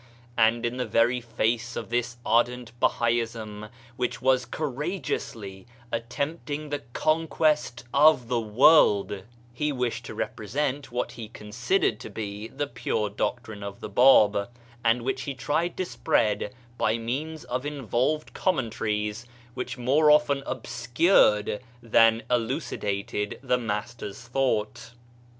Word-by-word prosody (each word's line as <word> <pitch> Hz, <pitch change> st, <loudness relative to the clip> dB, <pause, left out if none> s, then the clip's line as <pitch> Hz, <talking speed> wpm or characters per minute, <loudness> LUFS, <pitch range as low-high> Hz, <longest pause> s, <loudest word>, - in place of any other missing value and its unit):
And 115 Hz, +1 st, +3 dB
in 120 Hz, +2 st, -2 dB
the 125 Hz, -, -2 dB
very 120 Hz, +2 st, +2 dB
face 115 Hz, 0 st, -1 dB
of -, -, -5 dB
this 120 Hz, 0 st, -1 dB
ardent 120 Hz, +1 st, +1 dB
Bahaism 115 Hz, -3 st, 0 dB, 0.3 s
which 125 Hz, -, -2 dB
was 130 Hz, -1 st, +2 dB
courageously 125 Hz, -, -4 dB, 0.2 s
attempt 140 Hz, +8 st, -3 dB
ing 150 Hz, +1 st, -3 dB
the 145 Hz, -, -1 dB
conquest 155 Hz, -4 st, +1 dB
of 140 Hz, -3 st, +5 dB
the 120 Hz, -1 st, +1 dB
world, 105 Hz, -4 st, +4 dB, 0.3 s
he 150 Hz, +5 st, -1 dB
wished 125 Hz, -3 st, -2 dB
to -, -, -7 dB
represent 130 Hz, +5 st, -3 dB
what 120 Hz, 0 st, -2 dB
he 115 Hz, -2 st, -8 dB
considered 115 Hz, -, -1 dB
to -, -, -8 dB
be 105 Hz, 0 st, -5 dB
the 145 Hz, +5 st, -3 dB
pure 115 Hz, -5 st, -2 dB
doctrine 110 Hz, 0 st, -3 dB
of 100 Hz, 0 st, -7 dB
the -, -, -6 dB
Bab, 105 Hz, -3 st, +5 dB, 0.3 s
and 115 Hz, +1 st, +2 dB
which 130 Hz, +1 st, -1 dB
he 140 Hz, -1 st, -4 dB
tried 155 Hz, +8 st, -1 dB
to 185 Hz, -, -1 dB
spread 120 Hz, -11 st, 0 dB, 0.3 s
by 110 Hz, +1 st, +2 dB
means 145 Hz, +7 st, -4 dB
of 125 Hz, +1 st, -3 dB
involved 145 Hz, +1 st, -1 dB
commentaries 110 Hz, -, -1 dB, 0.3 s
which 125 Hz, -, -5 dB
more 140 Hz, +5 st, +3 dB
often 150 Hz, -2 st, +4 dB
obscured 120 Hz, -, +2 dB, 0.2 s
than 115 Hz, 0 st, +4 dB
elucidated 105 Hz, -4 st, -2 dB
the 125 Hz, -1 st, +1 dB
Master's 105 Hz, -1 st, -4 dB
thought. 120 Hz, -2 st, -1 dB
120 Hz, 130 wpm, -26 LUFS, 110-135 Hz, 0.3 s, of